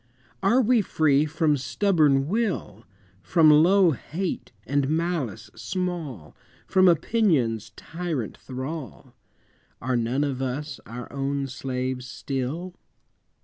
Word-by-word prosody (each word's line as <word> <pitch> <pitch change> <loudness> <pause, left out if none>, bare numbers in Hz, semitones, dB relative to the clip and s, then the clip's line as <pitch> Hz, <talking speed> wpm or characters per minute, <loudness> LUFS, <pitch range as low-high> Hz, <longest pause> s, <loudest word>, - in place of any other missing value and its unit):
Are 230 +7 +4
we 235 0 +4
free 155 -5 +2
from 155 -1 +1
stubborn 140 +1 +2
will, 185 - -2 0.4
From 160 - +5
low 175 +4 +6
hate 170 +6 -4
and 140 +2 0
malice 155 - -2
small, 165 - -4 0.3
From 185 0 +4
opinion's 155 - +2
tyrant 160 - -4
thrall? 130 -1 -7 0.7
Are 130 +1 -1
none 120 +4 0
of 135 -3 -2
us 135 +2 -3
our 120 +1 -7
own 140 0 -1
slaves 130 -1 -4
still? 140 +8 -4
145 Hz, 105 wpm, -25 LUFS, 130-175 Hz, 0.7 s, low